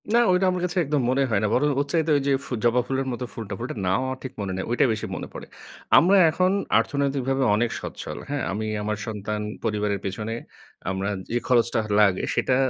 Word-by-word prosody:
না 235 - +6
ওইটা 180 +1 +3
আমার 180 -1 -2
কাছে 180 +1 -4
একদম 145 0 +1
মনে 135 +2 +2
হয় 105 -3 +2
না। - - +3
বরং 145 +4 +3
ওর 140 - +1
চাইতে 160 -1 +2
ওইযে 140 0 0
ফু - - -13
জবা 120 +1 +4
ফুলের 135 0 -1
মতো 125 +1 -4
ফুলটা 105 -3 -5
ফুলটার 120 -2 -5
নাম 95 +4 +2
আমার 130 0 -3
ঠিক 130 - -6
মনে 100 -2 -3
নেই, 95 - -3
ঐটা 120 - +3
বেশি 110 - -4
মনে - - -5
পড়ে। - - -8 0.5
আমরা 190 +4 +6
এখন 185 +3 +2 0.3
অর্থনৈতিকভাবে 135 +1 0
অনেক 120 +2 +1
সচ্ছল - - -6
হ্যাঁ? 145 -2 -2
আমি 105 +3 -2 0.2
আমার 105 0 -2
সন্তান 105 -1 -3 0.2
পরিবারের 105 -2 0
পেছনে 105 +3 -3 0.6
আমরা 95 +1 -2 0.2
যে 120 - 0
খরচটা 120 -2 +3
হ - - -7
লাগে 100 -3 +4
সেটা 130 - +2
120 Hz, 210 wpm, -24 LUFS, 105-140 Hz, 0.6 s, না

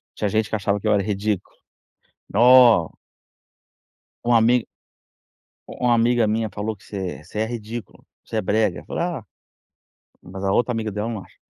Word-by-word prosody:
Tinha 105 - -1
gente 110 +1 0
que - - -1
achava 100 0 0
que - - -4
eu - - +4
era 100 -1 +2
ridículo. 105 -1 -2 0.8
Oh 120 -7 +6 1.3
Uma 120 0 +4
amiga 120 +1 +3 1.1
"u 125 - -2
uma 120 - +4
amiga 115 -1 +3
minha 110 0 0
falou 105 +2 -4
que 95 - -23
você 95 -8 -6
você 105 - -7
é 110 - +1
ridículo, 115 0 -7 0.2
você 110 - -4
é - - +1
brega." 100 -4 0
Eu - - -20
falei: - - -3
"Ah, 175 -9 -3 1.0
mas 95 +2 -8
a 95 - +1
outra 120 +2 +2
amiga 110 -3 -3
dela 105 +2 -3
não 110 -4 -4
acha." - - -23
110 Hz, 175 wpm, -22 LUFS, 100-120 Hz, 1.3 s, Oh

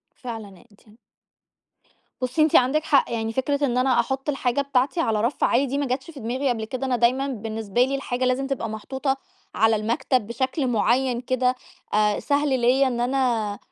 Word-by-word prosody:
فعلًأ 220 -6 -8
أنتِ 205 - -23 1.4
بُصّي، 255 +5 +1
أنتِ 310 - +4
عندِك 290 +5 +3
حق. 280 -5 +3
يعني 225 -1 -2
فكرة 285 +3 0
إن 250 -1 0
أنا 255 -1 +3
أحُط 265 +4 -3
الحاجة 270 -2 0
بتاعتي 280 +4 0
على 220 -9 +1
رَف 235 +5 0
عالي 265 +4 +3
دي 275 +2 -2
ما 285 - 0
جاتش 260 +5 -3
في 290 - -11
دماغي 255 +5 -1
قبل 225 -3 -1
كده، 255 +4 -4
أنا 250 -2 +1
دايمًا 250 +4 +2
بالنسبة 225 -2 -2
لي 275 +1 -2
الحاجة 255 -2 -2
لازم 255 +2 +1
تبقى 270 -4 -3
محطوطة 265 +6 -2 0.4
على 225 +1 +3
المكتب 225 +2 0
بشكل 260 +5 -2
معيّن 245 +1 +1
كده 255 0 +1 0.4
آآ 210 -1 +2
سهل 285 -3 +1
ليّا 260 +3 +4
إن 240 -2 -2
أنا 240 -5 0
255 Hz, 180 wpm, -24 LUFS, 230-270 Hz, 1.4 s, أنتِ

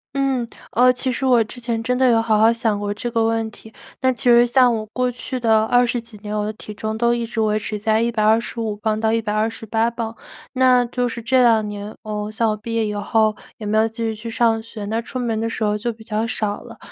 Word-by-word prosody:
嗯， 270 -3 0 0.2
呃， 250 +2 +5
其 255 +1 -1
实 260 +2 -2
我 245 -3 +5
之 245 +3 -10
前 235 -1 -2
真 250 +2 0
的 255 -1 +4
有 225 -1 +4
好 220 -2 +2
好 220 +1 +6
想 225 -3 0
过 205 0 -2
这 240 +3 -5
个 230 -1 +1
问 225 0 0
题， 220 +1 -14 0.3
但 260 -2 +2
其 - - -8
实 240 0 +6
像 250 0 +4
我 220 -1 -3
过 250 +3 -1
去 250 +1 -5
的 220 -2 +3
20 245 0 +2
几 230 -2 -14
年， 210 0 -5
我 210 0 -1
的 215 - -3
体 210 - -10
重 220 +1 -4
都 235 +1 +2
一 235 -1 -1
直 230 0 -5
维 215 0 +1
持 210 0 -4
在 220 +1 +1
125 225 -1 +1
磅 215 0 -1
到 220 0 +1
128 225 +1 0
磅。 230 -1 -5 0.4
那 255 -1 +4
就 245 +1 -1
是 235 0 -5
这 255 +3 +3
2 225 -3 +4
年， 205 +1 -6
呃， 210 -1 -4
像 225 0 +1
我 215 - -1
毕 230 +2 -6
业 225 -1 +1
以 210 - -3
后 215 +1 +1 0.2
也 215 - -8
没 215 +1 +1
有 220 +1 +4
继 225 - -13
续 225 -1 -2
去 230 +2 -7
上 225 -1 +2
学， 220 -2 -8
那 220 +3 -1
出 255 +2 -6
门 230 -3 -1
的 225 +1 -1
时 225 - -3
候 210 0 +1
就 235 +3 -2
比 220 - -15
较 220 0 -2
少 210 -2 -2
了。 - - -12
225 Hz, 255 characters per minute, -21 LUFS, 215-235 Hz, 0.4 s, 好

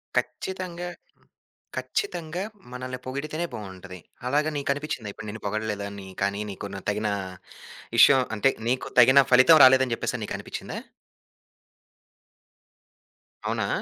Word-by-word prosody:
ఖచ్చితంగా, 180 -2 -3 0.9
ఖచ్చితంగా 175 - -3 0.3
మనల్ని 130 0 -5
పొగిడితేనే 155 +6 -3
బావుంటది. 95 -4 -8 0.3
అలాగా 150 +4 +2
నీకు 140 - -3
అనిపించిందా 140 -7 -5
ఇప్పుడు 110 - -9
నిన్ను 110 +1 -7
పొగడలేదా 105 -1 -2
అని 100 -1 -9
కానీ 100 +1 0
నీకు 100 +1 -6 0.2
తగిన 105 +1 0 0.9
విషయం 135 -2 +8
అంటే, 135 +6 +3 0.2
నీకు 130 - -1
తగిన 130 +3 +8
ఫలితం 130 +6 +8
రాలేదని 130 -1 +5
చెప్పేసి - - -3
నీకు - - -4
అనిపిచిందా? - - -6 2.7
అవునా? - - -1
130 Hz, 110 wpm, -26 LUFS, 105-150 Hz, 2.7 s, విషయం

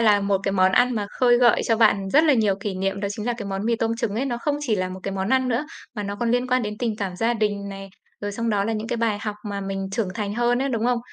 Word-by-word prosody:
là 210 -3 +5
một 200 -1 +1
cái 195 - 0
món 185 -1 +3
ăn 245 +4 +4
mà 210 -2 -2
khơi 245 -1 +6
gợi 240 -1 +4
cho 225 - +3
bạn 205 -3 +3
rất 305 +3 +5
là 295 - +5
nhiều 215 -5 +2
kỷ 200 -2 -3
niệm 195 +1 -2
đó 200 - -1
chính 215 +1 -5
là 240 - +1
cái 205 - -5
món 195 +1 -3
mì 235 0 +2
tôm 225 0 0
trứng 230 -4 -2
ấy. 245 +5 0
Nó 240 -3 -2
không 290 +3 -1
chỉ 235 -7 0
là 185 -1 -1
một 185 +1 -8
cái 195 - -3
món 190 0 -2
ăn 260 0 +2
nữa, 250 +5 0 0.3
mà 210 - -3
nó 200 0 -4
còn 235 -1 +1
liên 245 +1 +1
quan 255 -1 +2
đến 210 0 -4
tình 230 -4 -1
cảm 195 -3 -4
gia 230 +4 +1
đình 205 -2 -1
này, 195 0 -8 0.3
rồi 205 0 -3
xong 230 +2 -1
đó 200 -2 +1
là 225 - -1
những 220 +1 -3
cái 240 - -1
bài 225 -3 0
học 210 -2 -3
mà 200 -1 -3
mình 195 0 -3
trưởng 215 -1 -1
thành 205 -1 -3
hơn 240 +1 +2
ấy, 275 - 0
đúng 230 -4 -1
không? 245 -1 +2
215 Hz, 325 wpm, -23 LUFS, 200-240 Hz, 0.3 s, khơi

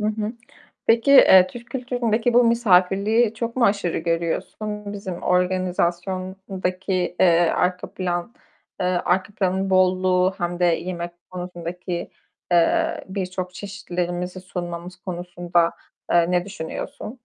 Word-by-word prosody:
Hı 210 - 0
hı. 215 +1 -2 0.5
Peki, 230 +4 +4
eee, 190 -8 +8
Türk 240 +4 -11
kültüründeki 245 -2 0
bu 245 - +6
misafirliği 215 0 +3
çok 230 +2 -4
mu 240 - +3
aşırı 200 -4 +1
görüyorsun? 200 +5 -3
Bizim 190 -3 -6
organizasyondaki, 185 +1 -1
eee, 170 -2 +5 0.2
arka 180 0 0
plan, 180 +4 -3 0.5
eee, 180 - +1
arka 185 +2 0
planın 190 0 0
bolluğu 185 0 +3
hem 175 0 -2
de 180 - +2
yemek 175 0 -1 0.2
konusundaki, 180 0 -5 0.4
eee, 325 - +2
birçok 185 -1 -4
çeşitlerimizi 180 -2 -4
sunmamız 175 -1 -6
konusunda, 175 -2 -1 0.4
eee, 170 0 +4
ne 180 -1 +2
düşünüyorsun? 200 +5 -7
185 Hz, 115 wpm, -23 LUFS, 175-205 Hz, 0.5 s, eee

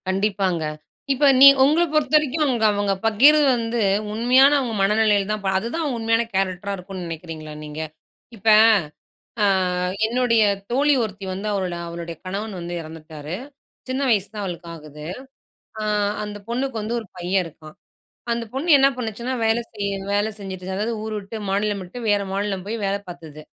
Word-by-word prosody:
கண்டிப்பாங்க. 190 -3 0 0.5
இப்ப 270 +2 +1 0.2
நீ 275 - +12 0.2
உங்கள 305 +5 +4
பொறுத்தவரைக்கும் 305 0 +2 0.3
அவுங்க 205 -1 0
பகிர்றது 285 +8 +6
வந்து, 230 0 -2 0.3
உண்மையான 250 +5 +5
அவுங்க 240 -5 -3
மனநிலையில 210 0 +3
தான் 215 0 -1
அப்ப 195 -1 -2
அதுதான் 285 +7 -3
உண்மையான 225 0 +1
கேரெக்டரா 195 +1 -1
இருக்குன்னு 185 0 -7
நினைக்கிறீங்களா 160 -2 -7
நீங்க? 150 +1 -6 0.5
இப்ப, 220 0 -9 1.0
அ - - +5 0.6
என்னுடைய 235 -1 +2 0.3
தோழி 285 +4 +3
ஒருத்தி 200 -2 -6
வந்து 195 +3 -5
அவளோட, 185 -3 -2
அவளுடைய 170 0 -6
கணவன் 200 +2 -4
வந்து 175 0 -6
இறந்துட்டாரு. 155 0 -8 0.5
சின்ன 260 +2 -1
வயசுதான் 205 -1 0
அவளுக்கு 175 -2 -6
ஆகுது. 150 -1 -11 0.8
அ - - -3 0.4
அந்தப் 205 -1 -9
பொண்ணுக்கு 255 +1 -2
வந்து 220 +3 -3
ஒரு 220 - -11
பையன் 180 +2 0
இருக்கான். 155 -1 -13 0.6
அந்தப் 230 -1 -4
பொண்ணு 280 +6 -3
என்ன 270 0 +6
பண்ணுச்சுன்னா 235 +1 -4
வேலை 225 +1 +2
செய்ய, 200 -2 -3 0.2
வேலை 205 +2 +1
செஞ்சிட்டு, 190 -2 -7
அதாவது 215 +4 -1
ஊரு 220 0 -4
விட்டு, 205 +2 -8
மாநிலம் 205 +1 0
விட்டு, 180 +7 -10
வேற 205 -1 +2
மாநிலம் 195 -1 -2
போய் 220 +3 -3
வேலை 195 +1 0
பார்த்தது. 160 -4 -10
205 Hz, 150 wpm, -22 LUFS, 185-235 Hz, 1.0 s, நீ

